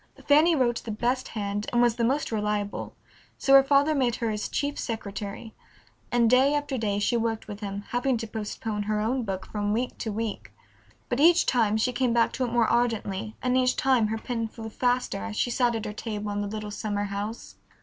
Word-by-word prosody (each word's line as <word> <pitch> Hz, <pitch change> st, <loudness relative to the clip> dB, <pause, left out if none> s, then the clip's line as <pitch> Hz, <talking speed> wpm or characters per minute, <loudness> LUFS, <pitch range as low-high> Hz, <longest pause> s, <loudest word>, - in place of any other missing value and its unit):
Fanny 310 Hz, +4 st, +5 dB
wrote 240 Hz, -4 st, +1 dB
the -, -, -7 dB
best 245 Hz, +4 st, -1 dB
hand 205 Hz, 0 st, -2 dB
and 240 Hz, -, +2 dB
was 240 Hz, -1 st, +4 dB
the 235 Hz, -, 0 dB
most 270 Hz, +4 st, 0 dB
reliable, 210 Hz, -1 st, -2 dB, 0.4 s
so 270 Hz, -, +2 dB
her 275 Hz, 0 st, +9 dB
father 280 Hz, +2 st, +3 dB
made 255 Hz, -5 st, +1 dB
her 230 Hz, -2 st, -1 dB
his 210 Hz, 0 st, -3 dB
chief 285 Hz, 0 st, -2 dB
secretary, 210 Hz, 0 st, -5 dB, 0.6 s
and 240 Hz, -1 st, +4 dB
day 260 Hz, +5 st, +4 dB
after 290 Hz, -2 st, -2 dB
day 210 Hz, -4 st, -1 dB
she 205 Hz, +4 st, +1 dB
worked 225 Hz, -1 st, -1 dB
with 205 Hz, -1 st, -7 dB
him, 200 Hz, -1 st, -5 dB
having 245 Hz, +1 st, +1 dB
to 225 Hz, -, -4 dB
postpone 215 Hz, -1 st, -4 dB
her 215 Hz, 0 st, +1 dB
own 240 Hz, +5 st, 0 dB
book 195 Hz, -4 st, -4 dB
from 205 Hz, -1 st, -2 dB
week 245 Hz, +3 st, -1 dB
to 220 Hz, -, -3 dB
week. 220 Hz, 0 st, -4 dB, 0.6 s
But 245 Hz, -, -1 dB
each 340 Hz, +3 st, +6 dB
time 220 Hz, -4 st, +2 dB
she 250 Hz, +3 st, +1 dB
came 245 Hz, -1 st, +1 dB
back 235 Hz, -1 st, +3 dB
to 260 Hz, -, -2 dB
it 240 Hz, -, -2 dB
more 235 Hz, -2 st, +3 dB
ardently 220 Hz, -3 st, 0 dB
and 250 Hz, 0 st, +1 dB
each 255 Hz, 0 st, +3 dB
time 255 Hz, -5 st, +3 dB
her 220 Hz, +1 st, -2 dB
pen 230 Hz, 0 st, -3 dB
flew 220 Hz, 0 st, -8 dB
faster 245 Hz, -, 0 dB
as 100 Hz, +1 st, -5 dB
she 245 Hz, -, 0 dB
sat 240 Hz, -1 st, +2 dB
at 225 Hz, -, -3 dB
her 210 Hz, -, -4 dB
table 210 Hz, -1 st, -4 dB
in 205 Hz, 0 st, -2 dB
the 205 Hz, -, -2 dB
little 210 Hz, 0 st, -5 dB
summer 205 Hz, -1 st, -2 dB
house. 205 Hz, +3 st, -5 dB
230 Hz, 215 wpm, -26 LUFS, 210-250 Hz, 0.6 s, her